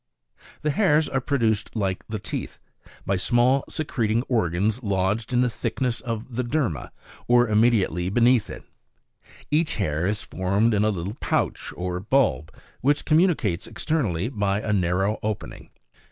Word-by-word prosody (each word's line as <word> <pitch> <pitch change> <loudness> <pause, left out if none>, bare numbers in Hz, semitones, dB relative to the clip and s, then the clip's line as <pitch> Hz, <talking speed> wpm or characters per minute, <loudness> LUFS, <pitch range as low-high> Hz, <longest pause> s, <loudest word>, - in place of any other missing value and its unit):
6. - - -28 0.2
The 150 - +1
hairs 155 -4 +3
are 135 - -1
produced 115 -6 0
like 95 -4 -1
the 110 - -3
teeth, 100 - -5 0.5
by 95 +1 +1
small 120 +7 +3
secreting 120 -7 -1
organs, 110 -1 0
lodged 100 +1 -1
in 125 0 +3
the 125 - +3
thickness 125 +2 -2
of 115 0 -5
the 125 - 0
derma, 120 - -1 0.4
or 120 0 +5
immediately 105 -6 +2
be 105 - 0
neath 120 -2 +4
it. - - -8 0.9
Each 155 +2 +2
hair 85 -4 -1
is 105 +1 -1
formed 100 +5 +1
in 105 0 +2
a 110 - +3
little 100 +3 -4
pouch - - -1
or 90 0 -3
bulb, 95 - +1 0.3
which 145 +3 +1
communicates 155 - +2
externally 115 - -1
by 100 -5 -1
a 110 -1 -1
narrow 95 +2 +1
opening. 105 -1 -5
110 Hz, 155 wpm, -24 LUFS, 95-125 Hz, 0.9 s, or